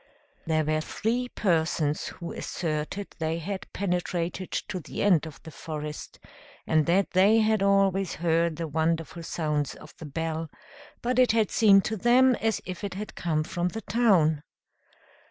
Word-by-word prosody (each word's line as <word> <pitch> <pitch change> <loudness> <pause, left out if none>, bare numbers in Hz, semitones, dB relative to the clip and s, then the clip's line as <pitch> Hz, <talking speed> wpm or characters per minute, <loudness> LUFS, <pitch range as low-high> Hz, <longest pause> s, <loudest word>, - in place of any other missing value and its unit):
There 155 -1 +1
were 155 +1 +1
three 240 +9 -2
persons 160 -7 0
who 170 -1 -7
asserted 160 +4 -3
they 160 0 -1
had 190 +4 -5
penetrated 180 -1 -2
to 190 -3 -3
the 155 - -5
end 175 -6 +3
of 155 - -11
the 160 - -10
forest, 150 -1 -7 0.5
and 155 -1 +2
that 185 +3 +2
they 195 +4 +5
had 215 -1 +2
always 195 -1 +2
heard 165 0 +1
the 165 +1 -4
wonderful 160 +2 -1
sounds 150 -4 -2
of 155 - -14
the 160 - -8
bell, 160 +2 -3 0.5
but 250 +1 +1
it 250 -3 +5
had 220 -2 +2
seemed 195 -3 +5
to 220 - -2
them 250 +5 +5
as 225 -1 0
if 185 +2 -7
it 200 -2 -4
had 210 +2 -6
come 155 -3 -1
from 175 +2 -2
the 220 +5 -5
town. 190 -9 +3
175 Hz, 160 wpm, -27 LUFS, 160-200 Hz, 0.5 s, they